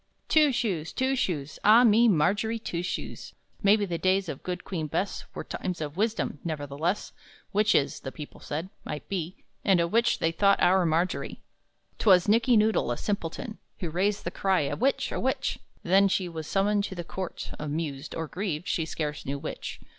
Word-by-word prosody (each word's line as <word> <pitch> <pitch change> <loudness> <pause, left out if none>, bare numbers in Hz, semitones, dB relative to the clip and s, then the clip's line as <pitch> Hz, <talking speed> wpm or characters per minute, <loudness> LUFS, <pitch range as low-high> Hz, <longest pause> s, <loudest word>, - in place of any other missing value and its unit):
Two 305 -2 +5
Shoes, 195 -11 -1
Two 260 +1 0
Shoes, 155 - -2
Ah 220 +4 +7
me, 230 +1 +6
Margery 205 +5 +2
Two 175 -6 -4
Shoes! 180 - -5 0.3
Maybe 205 0 +4
the 170 -3 -3
days 190 -1 +2
of 140 - -5
good 180 -1 -4
Queen 160 -5 -3
Bess 190 +7 -2
Were - - -4
times 180 -2 -4
of 150 -1 -4
wisdom; 215 -6 -1
nevertheless, 155 +3 -2 0.4
Witches 200 -9 +2
(the 135 - -6
people 150 +1 -9
said) 165 +6 -5
might 150 -2 -6
be 185 -2 -4 0.2
And 195 -3 +4
a 170 - +2
witch 230 +6 +2
they 165 - +1
thought 200 +4 +3
our 180 0 +4
Margery! 170 +3 -1 0.6
'Twas 185 -4 +5
Nickey 230 +3 +4
Noodle, 215 - +2
a 120 - -1
simpleton, 205 +2 -4 0.2
Who 170 -4 -3
raised 195 +5 0
the - - -3
cry, 190 -3 +1
"A 140 - -1
witch, 270 +4 +1
a - - -2
witch!" - - -1 0.2
Then 195 +3 +5
she 190 -1 0
was 160 -3 -6
summoned 200 +1 +2
to 190 - -6
the 175 - -4
court, 185 +1 -6
Amused, 150 -1 -4
or 165 - -2
grieved, 180 -2 -3
she 165 - 0
scarce 150 -2 -3
knew 140 +1 -3
which. 150 +2 -6
180 Hz, 185 wpm, -27 LUFS, 160-205 Hz, 0.6 s, Ah